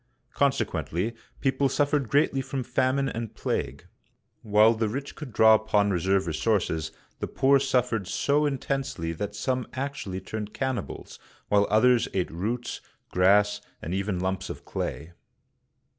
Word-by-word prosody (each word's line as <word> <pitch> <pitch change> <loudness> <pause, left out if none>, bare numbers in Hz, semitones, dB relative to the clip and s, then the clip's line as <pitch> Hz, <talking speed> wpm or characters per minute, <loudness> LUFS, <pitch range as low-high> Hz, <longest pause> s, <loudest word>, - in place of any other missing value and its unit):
Consequently, 115 - 0 0.3
people 135 0 +2
suffered 145 -2 +1
greatly 140 0 +2
from 135 0 -4
famine 130 +2 +1
and 115 -3 -5
plague. - - -3 0.6
While 105 +1 +5
the 110 -1 -1
rich 135 +5 -5
could 150 -5 -8
draw 110 0 +6
upon 105 -2 +2
reserve 95 +2 +1
resources, 80 -2 0 0.3
the - - -3
poor 135 +1 +3
suf 130 -2 +1
fered 105 -5 -2
so 145 +8 +1
intensely 135 - -2
that 105 +4 -5
some 125 +4 -1
actually 130 -8 -4
turned 105 +2 -6
cannibals, 130 - -4 0.3
while 100 0 +4
others 120 +3 +4
ate 90 -2 0
roots, 115 +9 -3 0.3
grass, 105 +3 +4 0.2
and 85 - -5
even 95 0 -1
lumps 95 +1 -2
of - - -8
clay. 80 +4 -4
110 Hz, 140 wpm, -27 LUFS, 95-135 Hz, 0.6 s, draw